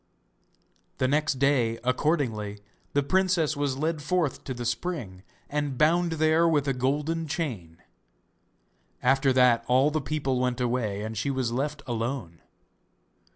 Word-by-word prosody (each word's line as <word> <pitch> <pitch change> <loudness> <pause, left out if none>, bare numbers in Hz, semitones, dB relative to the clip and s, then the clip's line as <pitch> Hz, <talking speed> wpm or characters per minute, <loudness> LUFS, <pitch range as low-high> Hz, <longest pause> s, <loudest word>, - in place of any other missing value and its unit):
The 130 - +1
next 150 +1 +1
day 130 -4 +2
accordingly 125 -6 0 0.3
the 145 - +2
princess 175 -1 +2
was 145 -2 -1
led 155 +1 -1
forth 160 -1 -1
to 130 - -3
the 120 0 -5
spring, 120 - -3 0.3
and 145 -3 -2
bound 170 +3 +3
there 160 +1 +3
with 145 -4 +2
a 135 - +2
golden 150 +6 -1
chain. 100 - -4 1.2
After 135 +1 +3
that 125 -2 +4
all 130 +4 +4
the 155 0 -1
people 135 -3 -1
went 125 -1 0
away 120 -5 -1
and 110 +1 -5
she 110 +7 -1
was 130 -4 -1
left 140 +3 -2
alone. 115 -7 -4
135 Hz, 140 wpm, -27 LUFS, 120-155 Hz, 1.2 s, that